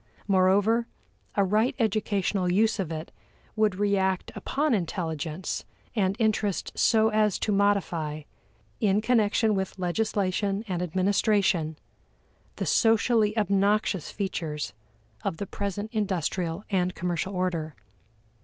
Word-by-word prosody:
Moreover, 200 +4 +3 0.5
a 200 - +4
right 215 +8 +2
educational 205 -5 0
use 220 +4 +2
of 175 -4 -2
it 160 0 -5 0.4
would 215 -3 +2
react 190 -2 0
upon 295 0 0
intelligence 165 -3 -2 0.3
and 195 -3 +1
interest 215 -4 0
so 220 -1 +3
as 215 -2 +2
to 215 - -1
modify, 175 -7 0 0.6
in 205 -2 +2
connection 220 -2 +2
with 190 -1 -2
legislation 195 +2 -1
and 180 -3 -2
administration, 185 -2 +1 0.8
the - - -3
socially 225 -1 +3
obnoxious 200 -2 +1
features 165 - -3 0.5
of 160 - -2
the 200 - -3
present 200 +2 -4
industrial 185 -3 -1
and 185 -1 +1
commercial 180 +2 -2
order. 170 -4 -2
200 Hz, 110 wpm, -27 LUFS, 180-215 Hz, 0.8 s, a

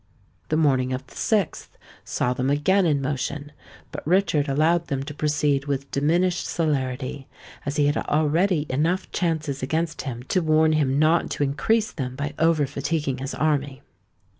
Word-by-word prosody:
The 155 - +1
morning 130 -5 +2
of 130 +1 -4
the - - -18
6th 205 -7 0 0.4
saw 125 - -1
them 130 +1 -1
again 175 +7 +3
in 145 -3 +1
motion; 145 +2 -3 0.4
but - - -6
Richard 160 -5 +2
allowed 160 +4 +2
them 135 -1 -2
to 150 - -7
proceed 145 -2 0
with 140 -1 -3
diminished 175 +5 +1
celerity, 135 -4 -2 0.4
as 140 - -2
he 150 -2 +3
had 145 - +2
already 155 +2 +1
enough 160 +8 0
chances 155 -5 -1
against 160 +4 -1
him 125 -3 -6
to 185 +8 0
warn 155 0 +3
him 140 -3 +1
not 155 +3 +3
to - - -1
increase 215 +11 +1
them 130 -4 -5
by 145 +1 -3
over 160 -2 +3
fatiguing 140 0 -2
his 135 +1 -4
army. 140 -3 -1
145 Hz, 165 wpm, -24 LUFS, 135-160 Hz, 0.4 s, again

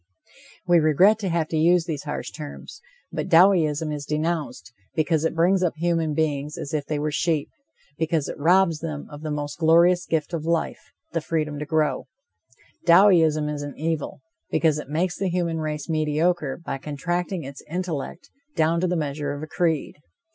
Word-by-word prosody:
We 175 -1 +5
regret 180 +8 +4
to 195 -3 -2
have 165 -2 0
to 160 - -1
use 170 +2 +4
these 155 -4 -4
harsh 145 - -4
terms. 150 -2 -9 0.3
But - - -4
Dowieism 165 -4 +4
is 145 -1 -6
denounced, 155 -4 -3 0.2
because 160 0 +1
it 165 - -1
brings 180 +3 +3
up 180 -3 0
human 165 -2 0
beings 150 0 -1
as 140 - -6
if 145 -2 -2
they 150 - -1
were 150 +1 -1
sheep, 155 -1 0 0.5
because 160 -2 0
it - - -6
robs 170 +1 +3
them 155 -3 -5
of 145 0 -9
the 155 - -4
most 145 +1 -4
glorious 170 +2 +4
gift 160 +1 -1
of 165 -3 -2
life, 165 0 -2 0.2
the 165 - 0
freedom 150 -2 -2
to 150 - -5
grow, 155 -3 0 0.8
Dowieism 170 -4 +5
is 150 -1 -3
an 145 -1 -7
evil, 155 -3 -3 0.3
because 155 -2 +2
it 150 - -8
makes 175 +4 -1
the 195 - 0
human 170 -2 -1
race 150 -1 -4
mediocre 155 -1 0
by 170 -5 -5
contracting 175 +5 -3
its 140 +1 -9
intellect 170 -2 -4 0.2
down 165 +1 +2
to 185 - +1
the 180 0 0
measure 145 -1 -2
of 145 +1 -6
a - - -6
creed. 160 -3 -1
160 Hz, 180 wpm, -24 LUFS, 150-170 Hz, 0.8 s, We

